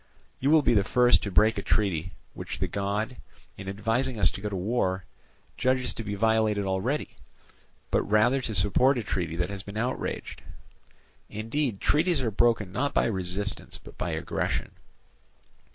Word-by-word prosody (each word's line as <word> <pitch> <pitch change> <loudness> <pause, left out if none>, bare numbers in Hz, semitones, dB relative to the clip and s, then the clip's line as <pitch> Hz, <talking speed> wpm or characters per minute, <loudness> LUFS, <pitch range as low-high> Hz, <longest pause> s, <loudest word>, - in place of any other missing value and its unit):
You 135 - +1
will 155 -1 +6
be - - +4
the 100 -3 +4
first 125 +4 +4
to 100 - -3
break 105 +4 +4
a - - -3
treaty 95 -5 0 0.2
which - - -6
the - - -1
god, 105 +5 -2 0.4
in 95 0 -7
advising 115 +5 -1
us 105 - +4
to - - -8
go 105 - -2
to 100 - -4
war, 95 -2 -1 0.5
judges 130 0 +1
to 115 - -6
be 105 -1 -3
violated 110 -1 +2
already, 95 +10 -2 0.7
but - - +3
rather 110 +6 +3
to 110 -4 -3
support 115 +8 +3
a 120 - -2
treaty 85 -5 -2
that 90 +3 -1
has 100 -1 -5
been 100 0 -8
outraged: 125 +3 -3 0.9
indeed, 115 +1 -2
treaties 165 +1 +2
are 120 -4 -1
broken 110 -3 +2
not 140 +8 -1
by - - +4
resistance 95 0 -3
but - - -14
by - - -1
aggression. - - -2
105 Hz, 170 wpm, -27 LUFS, 100-125 Hz, 0.9 s, will